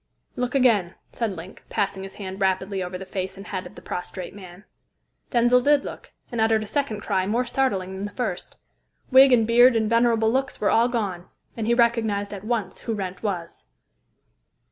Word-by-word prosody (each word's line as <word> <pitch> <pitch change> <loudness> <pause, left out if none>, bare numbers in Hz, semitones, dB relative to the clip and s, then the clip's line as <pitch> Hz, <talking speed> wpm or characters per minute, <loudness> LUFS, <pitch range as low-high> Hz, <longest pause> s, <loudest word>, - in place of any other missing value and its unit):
"Look 250 +1 -2
again," 220 -9 +3 0.2
said 225 -4 -2
Link, 180 +2 -10
passing 195 -2 -1
his 195 0 -9
hand 190 -1 -7
rapidly 190 0 0
over 180 0 -4
the 190 - -8
face 185 0 -5
and 195 - -9
head 190 -3 -5
of - - -16
the - - -12
prostrate 180 0 -6
man. 185 -1 -12 0.7
Denzil 240 +1 +4
did 290 +2 +3
look, - - -9 0.2
and 235 -2 -1
uttered 220 -1 +3
a - - -6
second 225 -3 -2
cry 190 -3 0
more 235 +4 +1
startling 200 -8 -1
than 190 +1 -4
the 205 - -6
first. 205 -5 -4 0.5
Wig 265 +1 +8
and 230 -3 +5
beard 240 +2 +6
and 220 -1 +2
venerable 230 -1 +3
looks 265 +2 -1
were 210 - +2
all 230 +1 +4
gone, 200 -8 -3 0.3
and 225 -2 -3
he 235 - +3
recognised 225 -4 +1
at 200 -1 -7
once 220 -4 -2
who 225 - -3
Wrent 190 -2 -5
was. 180 -6 -4
215 Hz, 190 wpm, -24 LUFS, 190-235 Hz, 0.7 s, Wig